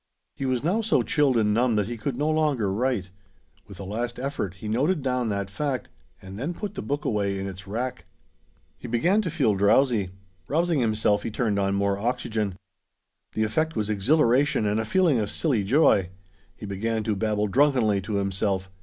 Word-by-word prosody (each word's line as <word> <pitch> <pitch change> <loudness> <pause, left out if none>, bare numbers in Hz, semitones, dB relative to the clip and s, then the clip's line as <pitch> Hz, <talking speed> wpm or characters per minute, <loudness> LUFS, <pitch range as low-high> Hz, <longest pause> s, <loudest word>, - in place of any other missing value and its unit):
He 135 - -3
was 130 -1 0
now 190 +8 +1
so 220 -1 +2
chilled 140 -5 +2
and 105 -2 +2
numb 120 +1 +2
that 105 -2 +1
he 120 - -4
could 120 +3 -4
no 145 +2 0
longer 150 -10 +1
write. 110 -4 -1 0.6
With 100 -3 -12
a - - -5
last 120 +5 -4
effort, 125 - -3
he 100 +3 -8
noted 140 - +1
down 125 -3 0
that 100 -2 -2
fact, 135 +1 -3 0.3
and 95 +2 -9
then 160 +7 -3
put 205 +1 -5
the 195 - -5
book 145 -3 -3
away 100 -3 0
in 95 - -4
its 95 -1 -8
rack. 120 +5 -4 0.7
He - - -8
began 170 - +2
to 185 - -3
feel 145 -10 +2
drowsy. 100 +1 +3 0.4
Rousing 165 +1 +1
himself, 110 -3 +1
he - - -4
turned 105 -2 0
on 100 0 +1
more 100 0 0
oxygen. 110 -4 -2 0.8
The 110 - 0
effect 155 +10 0
was 110 -1 -1
exhilaration 125 +3 +2
and 105 +1 +1
a 110 - -1
feeling 165 -1 +3
of 105 -1 -1
silly 130 -8 0
joy. 100 - +3 0.5
He - - -9
began 110 +3 -2
to 105 -1 -1
babble 105 0 0
drunkenly 120 -4 +2
to 100 +3 -5
himself. 95 -1 -1
115 Hz, 190 wpm, -25 LUFS, 100-140 Hz, 0.8 s, drowsy